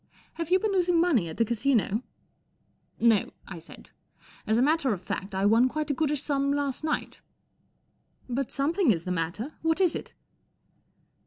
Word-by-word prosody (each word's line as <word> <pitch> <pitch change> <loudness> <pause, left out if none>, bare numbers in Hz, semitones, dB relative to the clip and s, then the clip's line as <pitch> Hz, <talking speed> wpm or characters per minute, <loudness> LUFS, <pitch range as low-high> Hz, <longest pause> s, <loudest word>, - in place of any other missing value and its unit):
" - - -31
Have 335 - -3
you 370 - +5
been 425 +2 -1
losing 355 -3 +2
money 275 - +2
at 160 - -8
the 230 - +3
Casino? 230 -2 +1 0.4
" - - -44
' - - -43 0.2
No," 225 -4 +3
I 175 -3 -7
said. 165 - -14 0.6
"As 220 - +2
a - - +3
matter 290 -4 +2
of 185 -2 -6
fact, 195 +1 -4
I 190 +1 +1
won 230 +5 +5
quite 305 +1 -2
a - - +1
goodish 295 0 -1
sum 280 -2 0
last 285 -1 -2
night." 310 -1 -2 0.5
" - - -44 0.3
But 260 +1 -2
something 320 +4 +1
is 170 -7 +2
the 180 - -4
matter. 180 - -3
What 325 +2 +1
is 365 -3 +3
it - - -7
275 Hz, 190 wpm, -27 LUFS, 210-310 Hz, 0.6 s, you